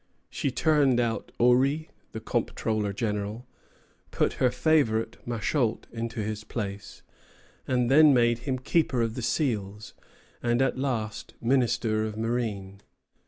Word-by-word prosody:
She 140 - -1
turned 135 -1 +3
out 115 -3 -1
Orry, 135 +6 +3 0.2
the 110 - -6
comptroller 110 -2 -1
general, 105 +2 -3 0.6
put - - 0
her 130 - +5
favorite, 125 -3 +1
Machault, 120 0 -1
into 115 -1 -4
his 110 0 -4
place, 100 -3 -6 0.6
then 135 +4 +5
made 120 -2 +3
him 130 +1 -2
keeper 130 -2 +1
of 115 -1 -2
the 125 - -5
seals, 110 -5 -2 0.5
and 120 0 +1
at 135 0 +2
last 115 -6 -3
minister 120 -3 +1
of 110 -1 -4
marine. 110 -4 -3
120 Hz, 120 wpm, -27 LUFS, 110-130 Hz, 0.6 s, her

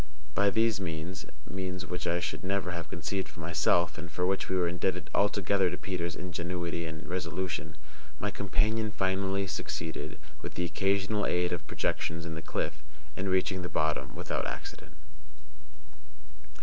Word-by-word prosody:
By 100 +4 +5
these 110 0 +3
means 85 +1 -3 0.2
(means 95 -1 -3
which 90 -1 -2
I 85 +1 +3
should - - -2
never 95 -1 +1
have 85 -3 -4
conceived 95 +4 -1
of - - -15
myself, 80 0 +3
and 85 +1 -6
for 90 +4 +1
which 95 +1 +1
we 95 - +2
were 90 -2 +4
indebted 85 0 0
altogether 100 -2 +4
to 90 - -3
Peters' 85 -3 -2
ingenuity 85 -1 -2
and 80 +3 -6
resolution) 90 0 -2 0.4
my 105 - 0
companion 105 +2 +2
finally 95 0 +1
succeeded, 80 -3 -3 0.2
with - - -5
the 90 - +1
occasional 100 +4 +2
aid 90 0 +2
of 85 - -3
projections 85 +1 0
in 85 - -3
the 80 - -4
cliff, - - -2 0.3
in 95 +1 -1
reaching 95 0 +3
the 90 - -3
bottom 75 0 +1
without - - -1
accident. - - -6
90 Hz, 155 wpm, -31 LUFS, 85-95 Hz, 0.4 s, By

